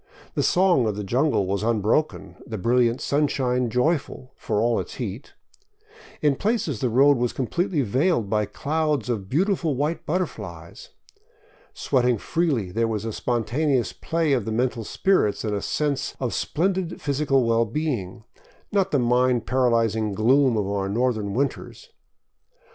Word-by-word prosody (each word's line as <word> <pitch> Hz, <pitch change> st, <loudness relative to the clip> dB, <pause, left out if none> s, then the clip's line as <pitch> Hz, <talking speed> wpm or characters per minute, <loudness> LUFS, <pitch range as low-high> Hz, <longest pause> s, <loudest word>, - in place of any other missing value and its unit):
The -, -, 0 dB
song 175 Hz, -10 st, +3 dB
of 105 Hz, -, -1 dB
the 105 Hz, -, -4 dB
jungle 125 Hz, +1 st, +1 dB
was 100 Hz, +1 st, -1 dB
unbroken, 115 Hz, +6 st, 0 dB
the 110 Hz, -3 st, -5 dB
brilliant 120 Hz, +3 st, +2 dB
sun 145 Hz, +1 st, +1 dB
shine 125 Hz, -3 st, 0 dB
joyful, 130 Hz, +1 st, -1 dB
for 105 Hz, -2 st, -2 dB
all 115 Hz, +1 st, +2 dB
its -, -, -6 dB
heat. 115 Hz, 0 st, -6 dB, 0.9 s
In 145 Hz, -3 st, +3 dB
places 200 Hz, -, -1 dB
the 125 Hz, -, 0 dB
road 135 Hz, +4 st, +5 dB
was 120 Hz, 0 st, -1 dB
completely 160 Hz, -, -1 dB
veiled 130 Hz, -, +1 dB
by 105 Hz, +1 st, +1 dB
clouds 150 Hz, -1 st, -1 dB
of 100 Hz, -5 st, -3 dB
beautiful 170 Hz, -1 st, +1 dB
white 150 Hz, +5 st, -2 dB
butterflies. 185 Hz, -, -5 dB, 0.9 s
Sweating 125 Hz, -3 st, +1 dB
freely, 135 Hz, -, -1 dB
there 115 Hz, +3 st, 0 dB
was 110 Hz, -1 st, -3 dB
a 110 Hz, -, -3 dB
spontaneous 125 Hz, +4 st, 0 dB
play 165 Hz, -3 st, -1 dB
of 120 Hz, -6 st, 0 dB
the 110 Hz, -, -3 dB
mental 120 Hz, 0 st, -1 dB
spirits 145 Hz, -, +1 dB
and 105 Hz, -2 st, -2 dB
a 100 Hz, -, -2 dB
sense 145 Hz, +2 st, -2 dB
of 125 Hz, -3 st, -2 dB
splendid 185 Hz, +2 st, -1 dB
phys 145 Hz, 0 st, -1 dB
ical 135 Hz, -4 st, +2 dB
well 115 Hz, 0 st, +2 dB
being, 115 Hz, -, -3 dB, 0.5 s
not 195 Hz, -2 st, +1 dB
the 145 Hz, -, +1 dB
mind 125 Hz, -1 st, +2 dB
paralyzing 115 Hz, -4 st, +1 dB
gloom 125 Hz, +4 st, +3 dB
of 105 Hz, -, 0 dB
our 100 Hz, -1 st, -2 dB
northern 110 Hz, -2 st, -1 dB
win 140 Hz, +3 st, +3 dB
ters. -, -, -12 dB
125 Hz, 155 wpm, -24 LUFS, 110-150 Hz, 0.9 s, road